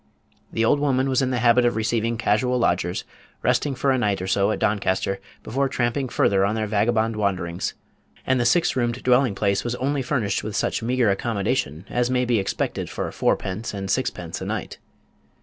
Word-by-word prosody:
The 115 - +1
old 145 - +3
woman 135 -2 +1
was 130 0 +2
in 130 - +1
the 125 - 0
habit 120 +1 +4
of 120 - +2
receiving 115 +1 0
casual 125 +2 +1
lodgers, 90 -5 0 0.4
resting 145 -2 +1
for 135 +2 +1
a 130 - +2
night 105 -4 +1
or 95 - -4
so 100 +1 +2
at - - -1
Doncaster 95 -1 0 0.2
before 135 +3 -1
tramping 130 +1 -1
further 95 -4 +2
on 100 +2 +1
their 110 -1 -1
vagabond 110 +2 +1
wanderings; 95 -4 -2 0.5
and 130 -1 +2
the 120 - +1
six 170 +3 +3
roomed 120 -1 -1
dwelling 125 -3 +3
place 100 -1 +1
was 120 0 -2
only 140 +2 -1
furnished 120 -7 -1
with 110 -1 -5
such - - 0
meagre 120 -2 +2
accommodation 105 - -1
as 120 0 0
may 125 0 +1
be 120 -3 +2
expected 95 - -2
for - - -4
fourpence 105 +4 -1
and 95 -1 -3
sixpence - - -2
a - - -4
night. - - -4
115 Hz, 190 wpm, -23 LUFS, 100-125 Hz, 0.5 s, habit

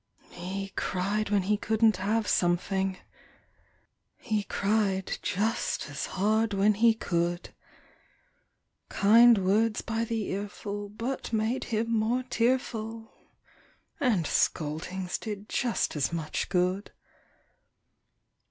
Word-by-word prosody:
He 195 +3 -5
cried 200 +2 -1
when 205 -2 +2
he 210 +3 +1
couldn't 220 -1 +2
have 210 +3 0
something; 190 +2 +1 1.2
He 215 -4 -1
cried 200 -2 0
just 210 -6 -1
as 140 - -4
hard 215 +2 +1
when 200 +2 +4
he 225 +2 +4
could; 175 -3 -2 1.4
Kind 230 +3 +6
words 215 +4 +2
by 225 0 -1
the 225 -1 -2
earful 200 +1 -5
but 230 +6 -4
made 225 +3 0
him 230 +1 -1
more 240 +4 0
tearful, 230 -2 -1 0.9
And 225 - +2
scoldings 180 +6 -1
did 210 -2 -6
just 240 -7 -1
as 150 +1 0
much 165 -2 -3
good. 185 +2 0
210 Hz, 105 wpm, -28 LUFS, 190-225 Hz, 1.4 s, Kind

